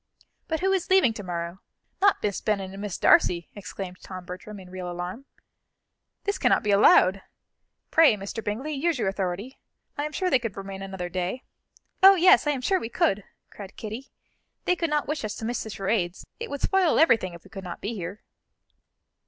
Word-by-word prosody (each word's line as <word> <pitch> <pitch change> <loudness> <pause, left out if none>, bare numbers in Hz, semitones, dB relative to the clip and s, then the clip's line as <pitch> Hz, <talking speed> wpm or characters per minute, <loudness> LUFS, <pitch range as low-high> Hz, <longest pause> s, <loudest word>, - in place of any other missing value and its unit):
"But 320 0 -2
who 385 +1 +2
is 380 -3 0
leaving 375 -12 +5
to 220 - -7
morrow? 170 -1 -5 0.4
Not 400 0 +3
Miss 205 -2 -1
Bennet 195 -3 -1
and 195 +1 -8
Miss 205 -3 -4
Darcy?" 170 -2 +3
exclaimed 190 -2 -7
Tom 185 -2 -8
Bertram 185 +4 -8
in 180 -1 -13
real 185 -1 -5
alarm. 175 +9 -6 1.0
"This 405 -1 -1
cannot - - +3
be 210 - +1
allowed. 195 -1 +5 0.7
Pray, 320 -8 +6
Mr. 205 +3 -6
Bingley, 240 +9 -3
use 315 +2 0
your 230 - -1
authority. 195 +5 -3 0.4
I 290 - 0
am 300 - -4
sure 365 +3 -1
they 260 - +5
could 230 -5 -5
remain 195 0 -6
another 190 -2 -5
day." 185 +7 -3 0.6
"Oh, 390 +1 +9
yes, 365 -2 +5
I - - +3
am 275 -3 -1
sure 380 +8 +2
we 225 - -5
could," 200 -3 +1 0.3
cried 200 -2 -10
Kitty; 225 +5 -7 0.6
"they 360 - +3
could 335 -2 -1
not 300 -1 0
wish 300 -3 -2
us 210 -1 -3
to 220 - -6
miss 240 +2 -2
the 220 - -6
charades 195 -3 -2
it 465 -1 -5
would 285 - -5
spoil 380 -4 +3
everything 220 - +3
if 170 - -14
we - - -17
could 195 -3 -8
not 175 -2 -7
be 215 - -4
here." 190 0 -6
210 Hz, 200 wpm, -26 LUFS, 185-295 Hz, 1.0 s, Oh